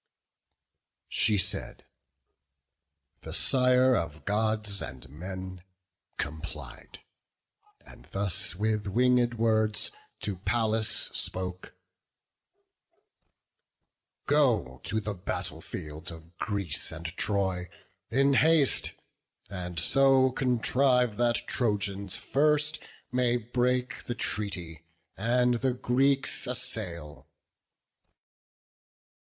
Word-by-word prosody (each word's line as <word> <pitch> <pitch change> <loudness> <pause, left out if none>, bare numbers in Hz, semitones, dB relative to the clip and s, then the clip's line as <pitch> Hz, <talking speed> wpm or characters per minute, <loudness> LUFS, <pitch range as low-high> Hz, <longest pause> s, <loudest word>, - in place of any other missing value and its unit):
She 105 -2 +3
said: 100 +1 -2 1.4
the - - -5
Sire 130 -1 +4
of 80 -4 -4
Gods 105 -1 +1
and 65 +1 -8
men 95 +5 -7 0.6
complied, 80 +2 -7 0.8
And - - -15
thus 95 -4 -1
with 105 +1 -1
winged 120 +2 +2
words 110 -2 +1 0.3
to 100 -3 -2
Pallas 110 +2 +1
spoke: 90 -4 -1 2.5
"Go 115 - +2
to 110 - 0
the 105 -1 -3
battle 90 -2 -5
field 75 -1 -7
of 80 +1 -13
Greece 100 -7 -1
and 80 +1 -9
Troy 95 -4 0 0.4
In 135 +3 +3
haste, 155 0 +3 0.6
and 90 -2 -6
so 135 +7 +4
contrive 125 -2 +2
that 120 0 +1
Trojans 100 -4 0
first 150 +2 +1 0.3
May 125 -1 +2
break 125 +2 -1
the 120 - -3
treaty, 90 -9 -2 0.3
and 120 +3 +2
the 130 -2 +1
Greeks 135 +2 +1
assail." 90 -11 -3
110 Hz, 85 wpm, -28 LUFS, 95-125 Hz, 2.5 s, Sire